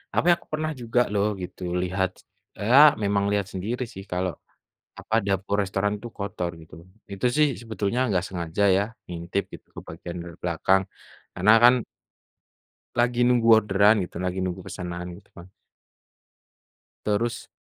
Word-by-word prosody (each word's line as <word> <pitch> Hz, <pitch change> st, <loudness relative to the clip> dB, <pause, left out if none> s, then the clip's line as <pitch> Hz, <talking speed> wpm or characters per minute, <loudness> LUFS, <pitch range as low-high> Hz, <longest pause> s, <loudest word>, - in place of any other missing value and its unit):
apa -, -, +2 dB
ya, -, -, +8 dB
aku -, -, -23 dB
pernah 155 Hz, 0 st, -1 dB
juga 120 Hz, +1 st, 0 dB
loh 100 Hz, 0 st, +2 dB
gitu 90 Hz, -, -8 dB, 0.2 s
lihat 95 Hz, +1 st, 0 dB
s -, -, -21 dB, 0.4 s
ea 120 Hz, +7 st, +5 dB, 0.2 s
memang 100 Hz, 0 st, +1 dB
lihat 100 Hz, -1 st, +1 dB
sendiri 110 Hz, +7 st, -3 dB
sih 95 Hz, -, -8 dB
kalau 90 Hz, 0 st, -1 dB, 0.7 s
apa, 110 Hz, -, -2 dB
dapur 100 Hz, 0 st, 0 dB
restoran 100 Hz, +2 st, -1 dB
tuh 120 Hz, -, -7 dB
kotor 95 Hz, -3 st, -3 dB
gitu, 80 Hz, -, -17 dB, 0.4 s
itu 100 Hz, +5 st, -3 dB
sih 150 Hz, -1 st, +5 dB
sebetulnya 110 Hz, 0 st, -2 dB
enggak 95 Hz, -3 st, 0 dB
sengaja 85 Hz, +1 st, -2 dB
ya, 100 Hz, -, +2 dB, 0.2 s
ngintip 90 Hz, +3 st, -3 dB
gitu -, -, -11 dB
ke -, -, -6 dB
bagian 85 Hz, +2 st, -7 dB
dari 85 Hz, -1 st, -10 dB
belakang, 90 Hz, +3 st, +2 dB, 0.5 s
karena 95 Hz, +4 st, +4 dB
kan 120 Hz, +1 st, +9 dB, 1.2 s
lagi 120 Hz, 0 st, +2 dB
nunggu 120 Hz, -2 st, +3 dB
orderan 105 Hz, -1 st, +5 dB
gitu, -, -, -18 dB
lagi 90 Hz, 0 st, -2 dB
nunggu 95 Hz, 0 st, -3 dB
pesanan 90 Hz, 0 st, -6 dB
gitu 100 Hz, -, -19 dB
kan. 90 Hz, 0 st, -12 dB, 1.6 s
Terus 110 Hz, +3 st, -1 dB
100 Hz, 155 wpm, -25 LUFS, 90-110 Hz, 1.6 s, kan